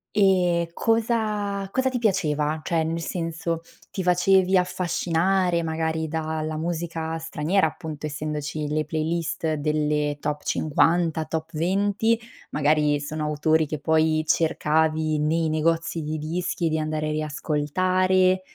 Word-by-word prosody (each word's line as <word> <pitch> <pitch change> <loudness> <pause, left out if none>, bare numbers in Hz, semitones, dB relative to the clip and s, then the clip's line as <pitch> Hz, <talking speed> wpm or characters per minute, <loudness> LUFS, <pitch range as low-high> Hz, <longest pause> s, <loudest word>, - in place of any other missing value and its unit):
Eh, 180 -4 +3
cosa, 215 -3 0
cosa 260 0 +1
ti 250 -2 -2
piaceva? 155 -7 +1
Cioè 165 -2 +1
nel 165 +1 -2
senso, 165 -1 -3 0.3
ti 190 - -3
facevi 185 +1 +4
affascinare 180 0 +1
magari 160 0 -1
da 160 0 -2
la 155 0 -3
musica 165 -1 -3
straniera 160 +3 +1
appunto, 155 -2 -7
essendoci 150 0 -4
le 155 0 0
playlist 160 0 -1
delle 150 -1 0
top 150 0 -3
50 160 +1 +1
top 160 0 -4
20. 205 +7 +1 0.3
Magari 150 0 +2
sono 150 +1 -4
autori 155 +1 +2
che 150 -1 -4
poi 155 +1 +2
cercavi 155 -1 +1
nei 160 +1 +1
negozi 165 +1 0
di 155 +1 -3
dischi, 165 +2 -2
di 160 0 0
andare 155 0 -2
a - - -1
riascoltare; 185 +5 +1
160 Hz, 125 wpm, -24 LUFS, 155-180 Hz, 0.3 s, facevi